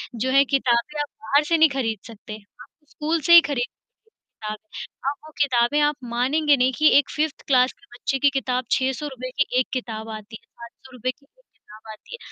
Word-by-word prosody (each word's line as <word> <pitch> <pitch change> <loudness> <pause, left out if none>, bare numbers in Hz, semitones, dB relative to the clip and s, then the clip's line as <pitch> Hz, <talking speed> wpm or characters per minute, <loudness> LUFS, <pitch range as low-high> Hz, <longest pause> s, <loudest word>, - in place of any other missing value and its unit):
जो 255 +3 -1
है 275 +1 +6
किताबें 270 +2 0
आप 295 - -4
बाहर 280 +7 +2
से 335 - +3
नहीं 320 0 +6
खरीद 230 -7 -2
सकते। 215 -1 -10 0.3
आपको 300 - -18
स्कूल 315 +1 -2
से 340 - +4
ही 340 - +11
खरीद 245 -3 0 0.8
ताब 215 0 -4 0.5
अब 280 - 0
वो 310 - -12
किताबें 255 0 +2
आप 295 0 +2 0.2
मानेंगे 285 +5 +2
नहीं 255 +1 +2
कि 310 0 +5
एक 285 - +2
5th 305 -1 -1
क्लास 255 -1 +4
के 335 - -25
बच्चे 270 +2 -2
की 285 - +4
किताब, 255 -2 -1
₹600 260 -1 -2
की 255 -2 +2
एक 255 - 0
किताब 225 -4 -5
आती 215 +1 -11
है, - - -32
₹500 250 +1 -8
की 280 +2 -29
एक - - -37
किताब 220 +1 -15
आती 215 - -15
है। - - -12
260 Hz, 200 wpm, -23 LUFS, 235-295 Hz, 0.8 s, ही